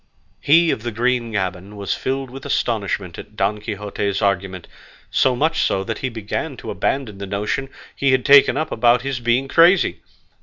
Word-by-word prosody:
He 165 Hz, +3 st, +4 dB
of -, -, -3 dB
the 120 Hz, +1 st, -4 dB
green 120 Hz, +1 st, 0 dB
gaban 95 Hz, 0 st, -3 dB
was 100 Hz, -1 st, -2 dB
filled 135 Hz, -1 st, -3 dB
with 135 Hz, +1 st, -9 dB
astonishment 100 Hz, -6 st, -2 dB
at 105 Hz, -, -12 dB
Don 105 Hz, +1 st, -1 dB
Quixote's 100 Hz, -2 st, -3 dB
argument, 95 Hz, -2 st, -1 dB, 0.4 s
so 130 Hz, -1 st, +2 dB
much 160 Hz, +5 st, +1 dB
so 95 Hz, -, 0 dB
that 110 Hz, +1 st, -4 dB
he 130 Hz, -, -2 dB
began 110 Hz, -4 st, -5 dB
to -, -, -7 dB
abandon 115 Hz, -8 st, -2 dB
the 100 Hz, -, -6 dB
notion 105 Hz, +7 st, -2 dB, 0.3 s
he 140 Hz, -1 st, +1 dB
had 130 Hz, -1 st, +1 dB
taken 140 Hz, -2 st, +6 dB
up 155 Hz, +1 st, -2 dB
about 120 Hz, +2 st, +3 dB
his 135 Hz, -2 st, -3 dB
being 120 Hz, +3 st, +1 dB
crazy. 170 Hz, +5 st, +4 dB
115 Hz, 180 wpm, -20 LUFS, 100-135 Hz, 0.4 s, taken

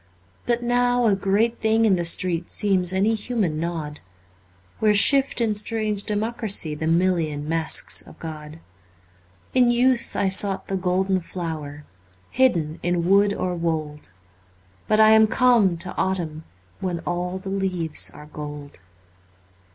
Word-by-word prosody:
But 240 Hz, 0 st, 0 dB
now 245 Hz, 0 st, +1 dB
a 215 Hz, -, +3 dB
great 200 Hz, +4 st, 0 dB
thing 220 Hz, +1 st, +2 dB
in 200 Hz, -4 st, +3 dB
the 175 Hz, -1 st, -2 dB
street 170 Hz, 0 st, 0 dB
Seems 190 Hz, -4 st, 0 dB
any 195 Hz, +4 st, +1 dB
human 210 Hz, -8 st, -2 dB
nod, 160 Hz, -3 st, -5 dB, 0.8 s
Where 210 Hz, -1 st, +3 dB
shift 270 Hz, +7 st, +4 dB
in 225 Hz, -2 st, +1 dB
strange 210 Hz, -1 st, -2 dB
democracy 210 Hz, -6 st, 0 dB
The 160 Hz, +1 st, -4 dB
million 165 Hz, -4 st, 0 dB
masks 165 Hz, 0 st, +1 dB
of -, -, -15 dB
God. 155 Hz, -1 st, -9 dB, 1.0 s
In 250 Hz, -2 st, +4 dB
youth 245 Hz, 0 st, +1 dB
I 200 Hz, -, +1 dB
sought 195 Hz, +1 st, +2 dB
the 195 Hz, -, -1 dB
golden 185 Hz, +1 st, 0 dB
flower 155 Hz, -5 st, -7 dB, 0.5 s
Hidden 170 Hz, -12 st, +1 dB
in 175 Hz, -1 st, -1 dB
wood 200 Hz, +2 st, +4 dB
or 185 Hz, -3 st, -3 dB
wold. 155 Hz, -, -4 dB, 0.8 s
But 215 Hz, -, +2 dB
I 220 Hz, 0 st, +6 dB
am 220 Hz, 0 st, +6 dB
come 225 Hz, -7 st, +3 dB
to 175 Hz, +2 st, -1 dB
autumn, 170 Hz, -5 st, -3 dB, 0.3 s
When 180 Hz, -3 st, -4 dB
all 180 Hz, +1 st, -3 dB
the 190 Hz, +1 st, -8 dB
leaves 185 Hz, -5 st, 0 dB
are 150 Hz, -, -13 dB
gold. 150 Hz, -3 st, -9 dB
190 Hz, 140 wpm, -22 LUFS, 165-215 Hz, 1.0 s, I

